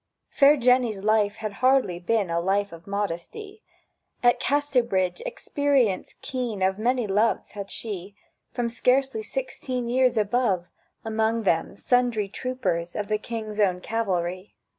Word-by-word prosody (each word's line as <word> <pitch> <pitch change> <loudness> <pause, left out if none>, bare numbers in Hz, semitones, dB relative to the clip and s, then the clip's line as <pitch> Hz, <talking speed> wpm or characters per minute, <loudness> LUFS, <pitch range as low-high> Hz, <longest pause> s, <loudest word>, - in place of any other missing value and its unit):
Fair 290 +1 +6
Jenny's 245 -5 +2
life 215 -1 +2
had 215 -2 -5
hardly 255 -9 +3
been 200 0 0
A 170 - +1
life 200 +3 0
of 165 +1 -12
modesty; 205 - -4 0.6
At 240 0 +4
Casterbridge 250 - +1
experience 285 - 0
keen 240 -7 -3
Of 190 +2 +1
many 245 +1 +1
loves 210 +3 +1
had 200 -2 -7
she 200 -3 -6 0.4
From 245 -2 -1
scarcely 250 0 +1
sixteen 255 0 -3
years 250 0 +2
above; 210 -4 +1 0.3
Among 220 +1 0
them 170 0 0
sundry 240 -5 +1
troopers 200 -9 -2
of 205 0 -3
The 215 0 +1
King's 215 -2 -5
Own 185 -3 +2
Cavalry. 185 -3 -2
220 Hz, 135 wpm, -25 LUFS, 195-250 Hz, 0.6 s, Fair